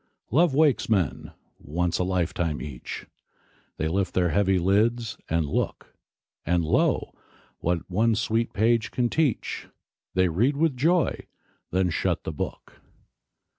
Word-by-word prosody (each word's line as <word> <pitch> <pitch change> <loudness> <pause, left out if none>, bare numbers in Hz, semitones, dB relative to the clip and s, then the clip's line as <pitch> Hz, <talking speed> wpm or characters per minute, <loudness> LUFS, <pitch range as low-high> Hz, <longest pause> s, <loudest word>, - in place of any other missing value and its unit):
Love 155 +2 +4
wakes 150 -6 +3
men, 95 -9 0 0.3
once 85 +3 -1
a - - +2
lifetime 90 -3 -1
each; 65 -5 -7 0.7
They 80 - -1
lift 95 +4 -1
their 90 -1 +3
heavy 95 +3 +2
lids, 110 +5 +1
and 80 -1 +1
look; 70 - -3 0.5
And, 85 0 +1
lo, - - +1 0.5
what 85 0 -1
one 110 +5 +2
sweet 115 +1 0
page 110 +1 +2
can 120 -1 0
teach, 150 -6 -1 0.5
They 95 0 +4
read 120 - +1
with 160 -2 +2
joy, 165 +5 +1 0.4
then 90 -1 +1
shut - - -1
the - - -4
book. - - -6
95 Hz, 135 wpm, -26 LUFS, 85-120 Hz, 0.7 s, Love